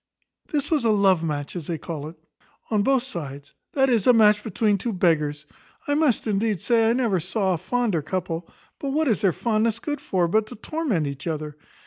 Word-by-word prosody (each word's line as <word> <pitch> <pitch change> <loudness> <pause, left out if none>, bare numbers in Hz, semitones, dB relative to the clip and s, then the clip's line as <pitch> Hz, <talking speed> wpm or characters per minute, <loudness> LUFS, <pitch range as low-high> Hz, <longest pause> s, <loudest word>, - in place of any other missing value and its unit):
"This 295 0 -1
was 300 -6 +2
a 230 - +3
love 195 -5 +3
match, 145 -1 -3
as 170 -5 -5
they 170 - -2
call 155 -1 -6
it, 160 - -10 0.6
on 215 -2 +3
both 265 +3 +2
sides; 145 - -7 0.2
that 270 -1 +3
is, 235 -5 +2
a 250 - +8
match 210 -2 +5
between 210 -2 +1
two 230 +3 -2
beggars. 150 -5 +1 0.4
I 290 - +1
must, 290 -5 +2
indeed, 210 -2 0
say, 225 +3 +3
I - - +3
never 235 -7 +1
saw 190 +2 0
a - - -1
fonder 215 -2 0
couple; 170 +1 -4 0.3
but 275 -1 -3
what 310 +1 +1
is 220 -6 +1
their 195 - +4
fondness 220 +3 0
good 290 +3 -4
for, 180 -9 0
but 215 +5 +1
to - - -9
torment 235 - -2
each 140 +2 -6
other?" 155 -2 -3
205 Hz, 205 wpm, -24 LUFS, 165-235 Hz, 0.6 s, a